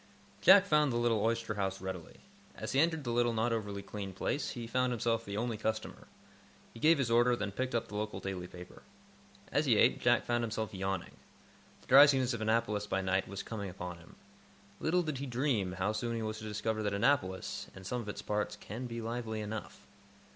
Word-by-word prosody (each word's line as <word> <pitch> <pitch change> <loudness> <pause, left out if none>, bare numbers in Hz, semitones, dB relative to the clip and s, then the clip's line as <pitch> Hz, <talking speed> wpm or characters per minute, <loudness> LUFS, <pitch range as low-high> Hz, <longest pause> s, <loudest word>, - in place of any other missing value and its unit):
Jack 190 +1 +8
found 150 -5 +3
the 120 - 0
oyster 115 -1 +1
house 95 -2 -2
readily. 95 -3 -7 0.3
As - - -5
he 135 - +2
entered 160 -1 +2
the 120 - -2
little, 120 0 +2
not 115 +1 +1
over 105 -3 -3
clean 100 -2 -6
place, 140 +9 -2
he 120 -1 -5
found 125 +2 +1
himself 115 -1 0
the 100 -2 -5
only 115 0 -1
customer. 110 +1 -3 0.7
He 115 - -11
gave 160 +5 +5
his 130 -4 0
order, 120 +1 +5
then 105 -3 -3
picked 130 +4 -2
up 115 0 0
the 105 - -9
local 105 +1 -3
daily 95 -2 -4
paper. 90 0 -12 0.7
As - - +1
he - - +5
ate, - - +4
Jack - - +3
found 120 0 0
himself 110 -1 -3
yawning. 95 -1 -3 0.6
The - - -22
drowsiness 135 -2 +7
of 115 - -4
Annapolis 110 -2 +1
by 95 -1 0
night 95 0 0
was 95 0 -5
coming 100 -3 -5
upon 90 -1 -7
him. 85 - -16 0.6
Little 175 +3 +2
did 155 -5 -3
he 140 - -4
dream 120 -7 0
how 95 +3 0
soon 115 +2 -2
he 115 - -2
was 110 0 -3
to 110 - -8
discover 110 +1 -2
that 105 -1 -1
Annapolis, 100 -5 0
in 95 - -10
some 125 +6 -3
of 105 - -7
its - - -6
parts, 105 0 -1
can 110 +4 -7
be 115 -1 -5
lively 115 -1 -3
enough. 105 0 -6
110 Hz, 205 wpm, -32 LUFS, 100-120 Hz, 0.7 s, Jack